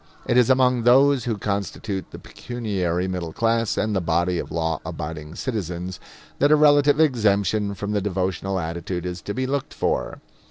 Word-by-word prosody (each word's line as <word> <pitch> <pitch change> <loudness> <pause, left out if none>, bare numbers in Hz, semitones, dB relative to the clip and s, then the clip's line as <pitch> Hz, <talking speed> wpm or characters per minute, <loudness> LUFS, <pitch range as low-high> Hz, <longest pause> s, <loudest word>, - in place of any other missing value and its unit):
It - - +1
is 125 -1 +5
among 125 -2 +3
those 130 +2 +4
who 115 -3 -1
constitute 100 0 -3
the - - -10
pecuniary 95 -7 -3
middle 90 -3 -4
class 115 -1 +1
and 110 -1 0
the 95 - +1
body 85 +1 0
of - - -5
law 80 -2 -1
abiding 75 +1 -6
citizens 90 - -4 0.4
that 145 +1 +4
a - - +8
relative 145 -1 +5
exemption 105 - +2
from 100 +2 -4
the 105 -1 0
devotional 95 -1 -2
attitude 85 +1 -4
is 90 -1 -5
to 100 - -5
be 130 +1 -1
looked 140 +1 -3
for. - - -1
100 Hz, 170 wpm, -23 LUFS, 90-120 Hz, 0.4 s, a